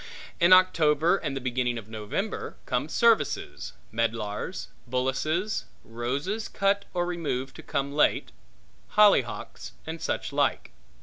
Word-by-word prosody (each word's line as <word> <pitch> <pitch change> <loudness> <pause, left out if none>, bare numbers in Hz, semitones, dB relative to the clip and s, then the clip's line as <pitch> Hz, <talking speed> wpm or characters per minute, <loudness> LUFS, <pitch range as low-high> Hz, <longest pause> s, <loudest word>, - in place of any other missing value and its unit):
In 170 0 +5
October 170 -2 +5
and 140 -6 -3
the - - -4
beginning 125 -1 -1
of 110 -2 -8
November 110 - -4
come - - -1
services; 230 -2 +1 0.2
medlars; 115 - -2 0.2
bullaces; 155 - -1 0.2
roses 140 - -3
cut 200 0 +1
or 175 -1 0
removed 150 -7 -3
to - - -8
come 140 +1 -2
late; 150 - +2 0.7
hollyhocks; 130 - +3
and 160 +1 -6
such - - -2
like. - - 0
150 Hz, 120 wpm, -27 LUFS, 120-185 Hz, 0.7 s, In